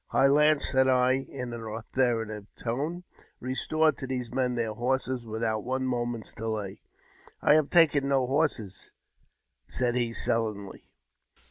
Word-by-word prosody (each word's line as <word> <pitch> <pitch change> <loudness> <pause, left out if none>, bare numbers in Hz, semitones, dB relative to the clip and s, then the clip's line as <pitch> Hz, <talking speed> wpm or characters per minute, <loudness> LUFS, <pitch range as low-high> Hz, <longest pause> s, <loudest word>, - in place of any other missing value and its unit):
"High 135 - +3
Lance," 150 +1 +4
said 130 -1 +3
I, 125 -1 +4 0.2
in 125 -3 -6
an 120 - -6
authoritative 110 -1 -2
tone, 150 +10 -3 0.4
"restore 155 +5 +1
to 135 - -8
these 125 -3 -4
men 125 -2 0
their 115 -2 -1
horses 125 +1 -2
without 110 -1 -2
one 130 +1 -2
moment's 120 -2 -3
delay." 110 -3 -4 0.3
" - - -24
I - - +6
have 155 -2 +3
taken 150 -5 +4
no 135 -2 +2
horses," 130 - -2 0.7
said 125 -2 -1
he, 120 -2 0
sullenly. 110 -4 -2
125 Hz, 140 wpm, -28 LUFS, 115-135 Hz, 0.7 s, I